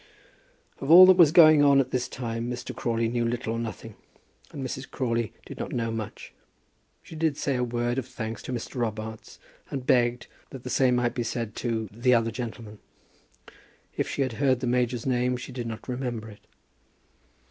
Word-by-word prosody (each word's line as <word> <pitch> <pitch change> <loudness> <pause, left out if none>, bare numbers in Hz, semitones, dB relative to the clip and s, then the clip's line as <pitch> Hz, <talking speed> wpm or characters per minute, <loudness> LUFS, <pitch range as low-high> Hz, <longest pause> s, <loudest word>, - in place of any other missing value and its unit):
Of 135 - -5
all 180 +3 +11
that 185 0 +7
was 165 -5 +7
going 155 -3 +7
on 140 -1 +5
at 135 - 0
this 125 -1 -1
time 115 -1 -4
Mr. 125 0 -6
Crawley 115 -1 -1
knew 120 +1 -1
little 115 0 -2
or 115 - -3
nothing, 115 0 -6 0.6
and 135 -2 -6
Mrs. 130 +1 -6
Crawley 115 -4 -2
did - - -10
not - - -5
know 115 -2 -1
much. 110 -2 -7 0.7
She - - -11
did 155 -2 0
say 140 - -1
a 125 - 0
word 120 +1 -1
of 125 - -6
thanks 110 -3 -6
to - - -7
Mr. 125 +1 -5
Robarts, 110 -2 -4 0.3
and 135 -2 -5
begged 120 -1 +2 0.2
that 130 -2 -10
the 125 - -5
same 130 -2 +3
might 120 -1 0
be 125 - -2
said 115 -2 -4
to 115 -2 -2
the 120 +4 +2
other 115 -1 +1
gentleman. 115 -2 -7 1.2
If - - -2
she 140 - 0
had 130 -3 -3
heard 130 -3 +3
the 130 - -3
major's 125 -1 0
name 125 -1 +1
she 125 - -8
did 120 -2 -5
not 115 -1 -7
remember 125 -4 -4
it. 105 - -18
120 Hz, 190 wpm, -26 LUFS, 115-130 Hz, 1.2 s, all